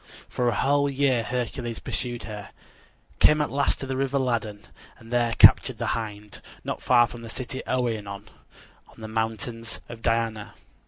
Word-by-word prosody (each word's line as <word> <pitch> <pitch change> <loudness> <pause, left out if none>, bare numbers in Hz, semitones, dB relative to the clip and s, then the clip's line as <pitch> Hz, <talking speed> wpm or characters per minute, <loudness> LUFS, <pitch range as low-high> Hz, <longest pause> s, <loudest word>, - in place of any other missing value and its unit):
For 125 - -1
a - - -1
whole 140 +1 +2
year 135 -3 +2
Hercules 120 -1 -3
pursued 120 0 -3
her; 105 -2 -7 0.7
came 150 - +6
at 150 - 0
last 140 +1 +1
to - - -3
the 135 0 -3
river 135 +1 0
Ladon; 115 -5 -2 0.3
and 115 +2 -11
there 120 -1 +2
captured - - +7
the - - -3
hind, 105 -2 -6 0.2
not - - -4
far 120 -1 +5
from 120 0 -9
the 115 - -8
city 130 +2 -5
Oenon, 110 -5 -2 0.6
on - - -20
the 110 - -7
mountains 115 +1 -3
of 115 -1 -9
Diana. 115 -2 -1
115 Hz, 165 wpm, -25 LUFS, 110-130 Hz, 0.7 s, captured